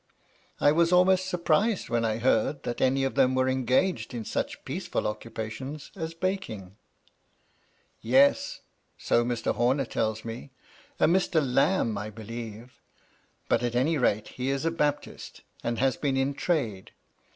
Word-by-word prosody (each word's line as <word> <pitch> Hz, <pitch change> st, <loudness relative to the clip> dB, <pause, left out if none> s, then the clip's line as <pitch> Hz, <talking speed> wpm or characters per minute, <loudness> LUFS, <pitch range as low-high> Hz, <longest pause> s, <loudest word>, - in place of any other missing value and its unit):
I 145 Hz, -, +5 dB
was 165 Hz, +2 st, +3 dB
almost 185 Hz, +1 st, +4 dB
surprised 180 Hz, +4 st, +1 dB
when 115 Hz, -1 st, 0 dB
I 110 Hz, -1 st, 0 dB
heard 120 Hz, +3 st, +1 dB
that 120 Hz, -, -4 dB
any 135 Hz, +1 st, +3 dB
of 135 Hz, -, 0 dB
them 130 Hz, -2 st, +3 dB
were 130 Hz, 0 st, +2 dB
engaged 130 Hz, 0 st, +1 dB
in 115 Hz, -2 st, -4 dB
such -, -, -3 dB
peaceful -, -, -3 dB
occupations 115 Hz, +7 st, -5 dB
as 165 Hz, -3 st, -5 dB
baking. 165 Hz, -, -3 dB, 0.7 s
" -, -, -40 dB, 0.5 s
Yes! 130 Hz, +5 st, +3 dB, 0.4 s
so 120 Hz, -, +2 dB
Mr. 120 Hz, -1 st, -1 dB
Homer 130 Hz, +3 st, +1 dB
tells 110 Hz, -1 st, -2 dB
me. 115 Hz, +4 st, -7 dB, 0.5 s
A -, -, +5 dB
Mr. 175 Hz, -1 st, +3 dB
Lambe, 135 Hz, -, +1 dB
I 105 Hz, +1 st, -5 dB
believe. 115 Hz, +2 st, -9 dB, 0.7 s
But, -, -, +2 dB
at 120 Hz, -1 st, -2 dB
any 145 Hz, +5 st, +2 dB
rate, 110 Hz, -4 st, +1 dB
he 130 Hz, +1 st, -3 dB
is 140 Hz, +2 st, -1 dB
a 165 Hz, -, +2 dB
Baptist, 150 Hz, -3 st, -3 dB, 0.2 s
and 120 Hz, 0 st, -1 dB
has 130 Hz, 0 st, +1 dB
been 135 Hz, -2 st, 0 dB
in 135 Hz, +1 st, +1 dB
trade. 125 Hz, -, -2 dB
130 Hz, 150 wpm, -27 LUFS, 115-155 Hz, 0.7 s, I